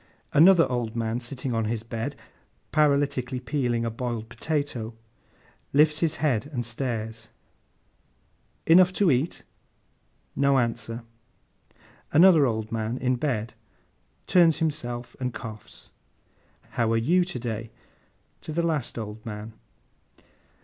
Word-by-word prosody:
Another 170 +2 +7
old 120 -3 -2
man 115 0 -1
sitting 125 +1 -5
on 115 -1 0
his 110 0 -2
bed, 115 0 -4 0.6
paralytically 140 -4 +1
peeling 125 -3 -1
a 115 - -1
boiled 115 -1 -4
potato, 130 -5 -3 0.8
lifts 150 +1 +4
his 165 -2 +1
head 135 -5 0
and 125 -5 -4
stares. 115 -2 -4 1.4
'Enough 180 +3 +6
to 190 -4 +3
eat?' 135 +6 0 0.9
No 140 -1 +3
answer. 115 -1 -2 1.1
Another 165 -3 +7
old 110 -2 -3
man, 115 +1 -2
in 130 0 +1
bed, 120 -4 -2 0.7
turns 170 -3 +5
himself 125 -7 -3
and 125 -2 -3
coughs. 110 -4 -9 0.8
'How 115 -2 0
are 115 - +3
you 170 +11 +3
to 180 -4 -5
day?' 115 -2 -4 0.7
To - - -7
the 170 +2 0
last 155 -9 -1
old 110 -1 -6
man. 110 0 -7
125 Hz, 120 wpm, -26 LUFS, 115-150 Hz, 1.4 s, Another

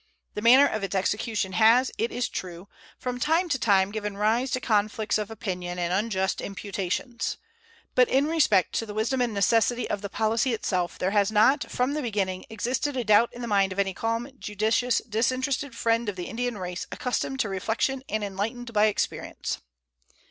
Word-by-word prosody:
The 210 - -4
manner 255 +5 +7
of 215 -7 -2
its 195 0 -3
execution 205 +1 -1
has, 230 +5 +5
it 230 - 0
is 245 -1 -1
true, 180 +1 -7 0.3
from 250 -1 -4
time 325 +7 +2
to 270 -4 0
time 195 -3 +3
given 210 -2 -4
rise 225 +5 +1
to 255 - -1
conflicts 215 -1 0
of 210 0 -4
opinion 180 -5 -4
and 175 0 -1
unjust 190 -1 0
imputations; 200 +4 -3 0.6
but 250 -1 +4
in 270 +2 +3
respect 295 - +2
to 225 - -4
the 210 - -7
wisdom 235 +4 0
and 240 -2 +1
necessity 225 +4 +2
of 200 - -3
the 200 - -5
policy 225 +4 +1
itself 180 -5 -2
there 185 - 0
has 205 0 +2
not 240 +7 +3
from 250 +3 0
the 305 - -2
beginning 195 -6 -2
existed 255 +5 -2
a 250 - 0
doubt 215 +2 +4
in 245 - -8
the - - -3
mind 200 -3 +2
of 185 - -6
any 195 -1 +1
calm, 230 +4 -2
judicious, 220 +4 0
disinterested 255 +4 -1
friend 230 -1 +1
of 200 - -4
the 180 -1 -5
Indian 245 -1 -3
race 180 -1 -5
accustomed 260 +1 -2
to - - -1
reflection 225 +7 -1
and 215 -1 -1
enlightened 225 +5 -4
by 210 0 +4
experience. 215 - -2
220 Hz, 185 wpm, -26 LUFS, 200-245 Hz, 0.6 s, manner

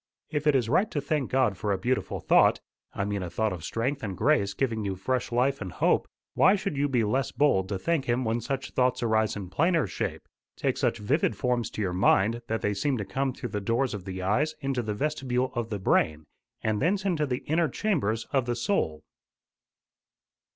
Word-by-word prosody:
If 150 -1 -1
it 150 - +5
is 125 -4 +2
right 195 - +2
to 150 - -2
thank 145 -1 -1
God 130 -7 +2
for 105 +4 -1
a 100 - +1
beautiful 125 +4 -1
thought - - +4 0.3
I 100 - -2
mean 100 -1 -2
a 90 - -4
thought 110 +2 0
of 85 -4 -7
strength 130 - -2
and 95 -4 -4
grace 100 -9 +2
giving 115 -4 -1
you 100 -1 -2
fresh 120 +8 -2
life 130 +2 +1
and 95 -3 -4
hope - - +2 0.3
why 190 - +5
should 195 -5 -3
you 145 +1 +1
be 125 -4 +2
less 130 +5 0
bold 120 -9 +2
to 100 - -1
thank 160 - 0
him 125 +1 0
when 115 +1 0
such 135 +3 -3
thoughts 125 -1 +1
arise 110 -1 +2
in 95 -3 -7
plainer 165 - +2
shape - - -4 0.3
take - - 0
such - - +1
vivid 120 +3 +1
forms 120 0 0
to 110 - -3
your 90 -2 -1
mind 100 +5 +3
that 110 0 -2
they 105 - +1
seem 130 +7 0
to 100 - -3
come 135 +4 -1
through 125 - -6
the 105 0 -3
doors 120 +5 0
of 100 -3 -6
the 95 -1 -5
eyes 140 +12 +1
into 135 -3 -1
the 105 -2 -3
vestibule 130 -2 -1
of 120 -2 -3
the 105 - -2
brain, 80 -5 +1 0.4
and 110 -1 0
thence 190 +6 +1
into 160 -6 +1
the 125 -1 -3
inner 160 +1 +1
chambers 120 - -1
of 130 -3 +1
the 120 - 0
soul?" 115 - -1
120 Hz, 215 wpm, -27 LUFS, 105-140 Hz, 0.4 s, it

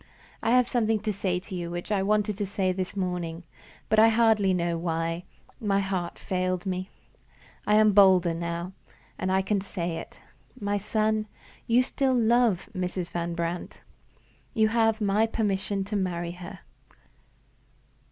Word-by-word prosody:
I - - 0
have 250 0 +4
something 225 -3 +1
to 215 -1 -1
say 185 -2 -1
to 190 - -11
you 175 -2 -3
which 175 +4 -5
I 200 -2 +2
wanted 210 +1 +1
to 205 - 0
say 190 -1 0
this 185 +1 -4
morning; 180 -3 -3 0.4
but, 220 - +3
I 225 +1 +7
hardly 220 -3 +3
know 170 -2 0
why, 165 +1 -2 0.3
my 200 -4 +1
heart 190 -3 -2
failed 185 0 -2
me. 185 0 -3 0.8
I 210 - +4
am 215 0 +6
bolder 190 -4 +5
now, 170 +1 -4 0.5
and 185 - -1
I 190 0 +2
can 200 0 0
say 175 -4 -4
it. - - -9 0.4
My 205 0 -1
son, 215 +1 0 0.4
you 240 +2 +4
still 265 0 0
love 235 -4 +3
Mrs. 180 -1 -3
Van 170 0 -3
Brandt. 170 +1 -3 0.8
You 220 -2 +4
have 225 -1 +2
my 210 +2 +2
permission 200 -2 -1
to 205 +2 -5
marry 175 -3 -1
her." 180 +1 -10
195 Hz, 155 wpm, -27 LUFS, 180-215 Hz, 0.8 s, I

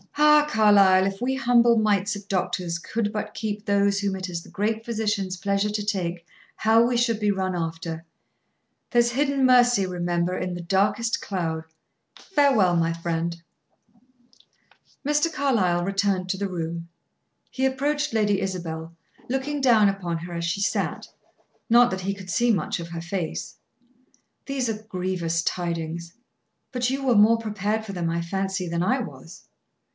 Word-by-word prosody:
"Ah, 300 0 +6
Carlyle! 200 -5 +5
If 195 +1 -3
we 260 +2 0
humble 240 -2 +4
mites 205 -2 +1
of 205 - -6
human 200 - -32
doctors 180 -3 -1
could 210 +4 -3
but 210 0 -4
keep 210 -1 -4
those 200 0 +2
whom 200 -1 -1
it 185 0 -5
is 170 -1 -4
the - - -15
Great 220 +2 -2
Physician's 210 -5 -2
pleasure 200 +2 0
to 210 0 -3
take, 175 -4 -2 0.3
how 220 +1 +4
we 240 0 +1
should 235 -2 +1
be 210 -1 +1
run 190 -2 -1
after! 165 -1 -4 0.9
There's 240 -1 +3
hidden 275 +1 +1
mercy, 245 -5 +5
remember, 175 0 -1
in 180 -1 -3
the 175 - -5
darkest 200 +6 +1
cloud. 165 -5 -3 0.5
Farewell 270 - +2
my 165 0 +1
friend." 170 0 -3 1.7
Mr. 295 +3 +2
Carlyle 190 - +1
returned 195 -1 0
to 190 - -1
the 200 0 -2
room. 170 -1 -5 0.6
He 265 - -1
approached 290 +3 0
Lady 205 -3 +1
Isabel, 170 -3 -5 0.3
looking 270 +3 -2
down 230 -5 +5
upon 185 -4 -2
her 175 +1 -8
as 170 0 -3
she 175 +4 -1
sat; 200 - -1 0.6
not 240 +1 +6
that 190 0 -3
he 195 +2 -2
could 190 -2 -11
see 240 +6 +3
much 180 -6 -1
of 170 0 -7
her 170 -1 -5
face. 165 - -4 0.9
"These 270 -3 -1
are 215 -1 -3
grievous 180 -5 -2
tidings. 170 -1 -3 0.6
But 250 -1 0
you 270 +1 -2
were 250 -3 +3
more 215 +2 +6
prepared 215 0 -2
for 200 - -6
them, 175 -2 -2
I 170 0 -1
fancy, 190 +1 -2
than 170 0 -2
I 250 +9 +2
was." 165 - -9
195 Hz, 160 wpm, -24 LUFS, 175-230 Hz, 1.7 s, Ah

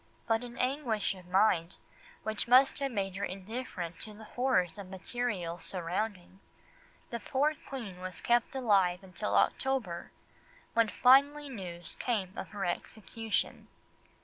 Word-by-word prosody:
But 225 +1 +1
in 240 -1 -7
an - - -13
anguish 250 -6 0
of 185 -2 -13
mind 180 -2 +3 0.5
which 220 +2 -1
must 260 +3 +6
have 275 -1 -1
made 195 -4 -2
her 200 - -3
indifferent 190 -3 -5
to 215 -1 -6
the 220 - -11
horrors 210 -8 +1
of 195 -2 -8
material 190 -3 -3
surroundings, 185 +1 -3 0.7
the 235 - -2
poor 280 +7 +1 0.2
Queen 220 -10 -6
was 185 -1 -5
kept 240 +2 +2
alive 195 -7 +3
until 190 +3 -3
October, 250 -11 +1 0.6
when 230 -1 +4
finally 280 +5 +5
news 175 -8 -6
came 200 -7 -1
of - - -5
her 200 -3 -3
execution. 220 +4 -2
210 Hz, 140 wpm, -32 LUFS, 185-245 Hz, 0.7 s, must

